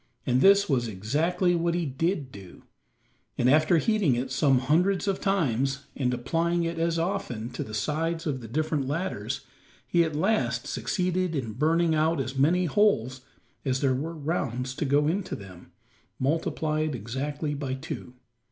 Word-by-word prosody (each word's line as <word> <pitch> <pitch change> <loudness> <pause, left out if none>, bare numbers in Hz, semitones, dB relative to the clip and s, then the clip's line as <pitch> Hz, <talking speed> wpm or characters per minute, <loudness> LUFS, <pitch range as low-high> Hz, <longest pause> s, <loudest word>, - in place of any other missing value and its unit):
And 125 +1 +2
this 200 +1 +6
was 125 -5 +1
exactly 150 - 0
what 170 0 +1
he 175 -1 0
did 145 0 -1
do; 95 -5 -12 0.7
and 120 - +2
after 155 +5 +5
heating 200 - +2
it 130 +2 -3
some 135 0 +3
hundreds 175 +10 +2
of 195 -1 0
times, 140 - 0
and 125 -3 0
applying 165 +7 0
it 165 0 -2
as 165 0 +1
often 165 - -2
to 120 - -4
the 110 - -7
sides 160 +9 -1
of 135 -5 -2
the 115 - -8
different 150 +2 -1
ladders, 170 +7 -3 0.4
he 170 -1 +3
at 160 -2 -3
last 130 - +1
succeeded 185 -3 -1
in 115 -6 -3
burning 160 +6 +2
out 160 0 +2
as 130 0 -3
many 165 +7 +3
holes 135 - +2 0.4
as 130 -2 0
there 135 -2 +3
were 155 +6 -3
rounds 135 -5 -2
to 150 - -1
go 145 +2 +3
into 185 +4 -1
them, 95 -3 -12 0.5
multiplied 155 +1 0
exactly 140 +7 -3
by 140 -2 -3
two. 130 -3 -7
150 Hz, 160 wpm, -27 LUFS, 130-170 Hz, 0.7 s, this